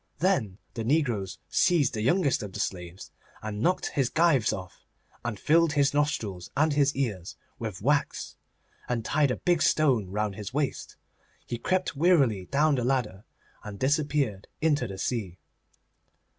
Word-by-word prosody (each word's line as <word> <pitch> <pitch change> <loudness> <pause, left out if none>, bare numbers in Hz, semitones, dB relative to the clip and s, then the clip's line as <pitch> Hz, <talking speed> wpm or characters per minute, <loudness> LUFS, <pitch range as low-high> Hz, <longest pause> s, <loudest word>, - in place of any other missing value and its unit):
Then 155 - +1 0.2
the 115 - -4
negroes 120 - 0
seized 155 -8 +2
the 110 - -2
youngest 140 - +2
of 105 -3 -7
the - - -6
slaves 90 -1 -5 0.3
and 105 -1 -4
knocked 180 +6 +1
his 135 -3 0
gyves 160 -8 +3
off, 95 -2 -7 0.4
and 115 -4 -4
filled 165 - +3
his 145 -1 +2
nostrils 110 -11 -1
and 155 +1 +3
his 145 0 +2
ears 105 -10 -3 0.2
with 105 -4 -5
wax, 145 +3 0 0.5
and 115 -2 -1
tied 145 -1 +2
a 125 - 0
big 175 -2 +1
stone 130 -11 +3
round 105 +1 -1
his 105 +5 -7
waist. 145 -2 -2 0.5
He 120 - -4
crept 185 +5 0
wearily 135 - +3
down 150 +7 +2
the 125 -3 0
ladder, 120 -6 -1 0.4
and 105 -1 -7
disappeared 140 -6 0
into 145 -5 +1
the 95 -2 -7
sea. 95 -4 -3
125 Hz, 155 wpm, -27 LUFS, 105-150 Hz, 0.5 s, gyves